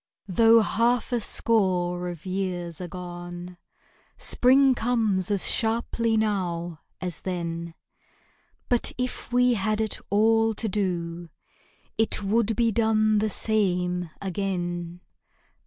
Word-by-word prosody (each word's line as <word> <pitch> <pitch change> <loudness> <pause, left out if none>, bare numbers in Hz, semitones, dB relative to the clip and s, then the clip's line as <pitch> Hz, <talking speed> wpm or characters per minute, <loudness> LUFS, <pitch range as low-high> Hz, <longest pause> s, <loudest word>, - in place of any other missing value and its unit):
Though 225 +4 +5
half 235 +4 +1
a 240 - +1
score 180 -6 0
of 175 -1 -9
years 185 -3 -4
are 180 - -5
gone, 175 0 -8 0.6
Spring 265 +2 +4
comes 220 -6 0
as 200 -2 +4
sharply 230 0 +1
now 175 -6 -2 0.2
as 180 -3 -3
then 170 -2 -4 0.9
But 245 -1 +2
if 250 -1 -4
we 250 0 +3
had 215 0 -1
it 220 -2 -1
all 225 +2 +3
to 225 - -3
do 175 -4 -3 0.7
It 220 -1 +3
would 220 +2 +1
be 230 +1 +2
done 215 -1 +2
the 215 +1 0
same 180 -5 0
again. 175 -3 -4
195 Hz, 115 wpm, -25 LUFS, 175-225 Hz, 0.9 s, Though